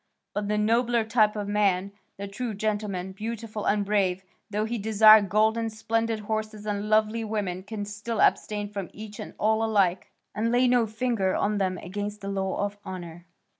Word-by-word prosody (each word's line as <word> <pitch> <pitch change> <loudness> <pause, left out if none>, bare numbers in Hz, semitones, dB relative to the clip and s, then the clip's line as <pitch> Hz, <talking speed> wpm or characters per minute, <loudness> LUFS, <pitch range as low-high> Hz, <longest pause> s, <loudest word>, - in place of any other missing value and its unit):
But 205 0 -2
the 210 0 0
nobler 230 +2 +2
type 220 -1 +2
of 205 -1 -3
man, 200 -2 +1 0.3
the 200 +1 -5
true 215 +2 -4
gentleman, 205 -3 -2
beautiful 220 +1 -5
and 205 0 +2
brave, 190 -2 +1 0.3
though 210 +1 -1
he 230 +1 -3
desire 215 +1 +7
gold 215 +3 +2
and 225 -1 -2
splendid 225 0 -1
horses 215 0 -4
and 205 0 -2
lovely 215 +1 +2
women, 205 -4 -2
can 205 +1 -5
still 210 +2 -5
abstain 210 -1 +2
from 200 -4 -5
each 210 0 -9
and - - -8
all 220 +1 +2
alike, 200 -5 +1 0.2
and 225 +2 0
lay 250 +1 +4
no 245 -2 +3
finger 220 -4 0
on 210 0 0
them 185 -1 0
against 205 +4 -5
the 200 - -5
law 195 0 -1
of 205 0 -6
honour. 175 -2 -8
210 Hz, 180 wpm, -26 LUFS, 200-220 Hz, 0.3 s, desire